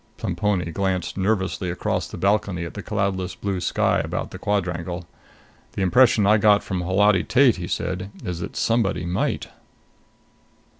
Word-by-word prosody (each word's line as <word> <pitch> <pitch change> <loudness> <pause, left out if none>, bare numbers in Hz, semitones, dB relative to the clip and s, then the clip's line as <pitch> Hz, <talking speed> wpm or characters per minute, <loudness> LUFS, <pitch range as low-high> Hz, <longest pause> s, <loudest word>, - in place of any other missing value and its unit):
Plemponi 95 -6 -1
glanced 95 -1 -1
nervously 95 -2 -1
across 90 - -2
the - - -9
balcony 100 -3 0
at 85 - -7
the - - -6
cloudless 100 -3 -2
blue 100 -2 -3
sky - - +1
about - - -3
the - - -8
quadrangle. 90 -4 -2 0.7
"The 95 - -1
impression 115 +1 +4
I 105 +2 +5
got 105 -1 +4
from 95 -2 -3
Holati 95 +1 +3
Tate," 125 0 +4
he 90 0 -5
said, 90 +3 -3
"is 90 -2 -4
that - - -6
somebody 115 -6 +1
might." 90 +2 -1
95 Hz, 150 wpm, -23 LUFS, 90-105 Hz, 0.7 s, I